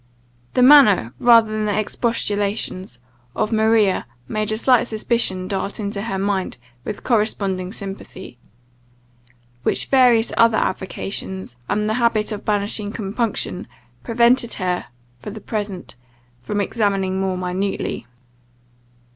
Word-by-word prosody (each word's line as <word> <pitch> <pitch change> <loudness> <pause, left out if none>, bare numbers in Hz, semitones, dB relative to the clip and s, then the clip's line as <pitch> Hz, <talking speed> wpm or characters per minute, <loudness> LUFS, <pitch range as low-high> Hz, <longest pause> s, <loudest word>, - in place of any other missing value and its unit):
The 250 - +4
manner, 230 - +6
rather 230 -2 +5
than 215 0 -1
the 205 -1 0
expostulations, 205 - -1 0.4
of 215 +1 -1
Maria 220 - +2 0.2
made 215 0 -2
a 215 - -1
slight 245 0 +3
suspicion 215 -5 -1
dart 200 +2 -3
into 200 -1 -3
her 200 -3 -3
mind 195 -4 -1 0.3
with 205 - -6
corresponding 200 -5 0
sympathy, 195 - -9 1.2
which - - +1
various 245 -4 +4
other 230 -1 +4
avocations, 190 -5 -3
and 210 +1 0
the 215 - 0
habit 225 -2 +1
of 210 -1 -5
banishing 205 0 0
compunction, 210 -2 -3 0.4
prevented 235 +1 +3
her, 180 -2 -2 0.3
for - - -8
the 215 +1 -8
present, 205 -4 -5 0.5
from 205 +12 -2
examining 195 -3 0
more 190 -1 -1
minutely. 185 -2 -3
210 Hz, 120 wpm, -21 LUFS, 190-225 Hz, 1.2 s, manner